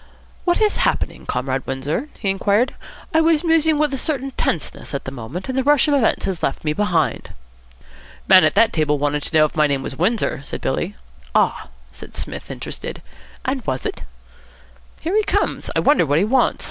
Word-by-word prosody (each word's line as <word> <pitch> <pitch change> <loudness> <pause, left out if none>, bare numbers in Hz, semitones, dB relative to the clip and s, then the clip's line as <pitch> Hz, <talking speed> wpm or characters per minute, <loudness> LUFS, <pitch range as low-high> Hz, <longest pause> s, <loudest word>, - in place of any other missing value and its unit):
"What 350 -1 +2
is 430 -1 +2
happening, - - -1
Comrade 130 +1 -1
Windsor?" 140 - -3
he 195 - 0
inquired. 205 +6 +1 0.4
"I 320 - +5
was 320 -1 +3
musing 320 -2 +3
with 300 -1 +1
a 270 - -2
certain 275 -2 -2
tenseness 160 - -3
at 140 - -4
the 130 - -5
moment, 135 +8 -7
and 260 - -3
the 265 - +2
rush 290 0 +4
of 295 - +2
events 270 -6 +2
has 190 -3 -3
left 135 - -2
me 150 -1 0
behind." 175 -5 0 0.9
"Man 185 -1 +8
at - - +3
that 225 +2 +4
table 150 -2 +1
wanted 145 +1 0
to 160 - 0
know 155 - +6
if 150 - -5
my 155 -1 +4
name 140 -2 -1
was - - -5
Windsor," 180 - 0
said - - -5
Billy. - - -2 0.4
"Ah?" - - +2 0.2
said 65 - -12
Psmith, - - -6
interested; - - -6 0.4
"and 260 0 -1
was 130 -2 -2
it?" - - -4 1.0
"Here 345 +5 -1
he 430 - +4
comes. - - -1
I - - +3
wonder 285 - +4
what 145 +1 +2
he 185 - +3
wants. 250 +3 +2
195 Hz, 200 wpm, -20 LUFS, -, 1.0 s, Man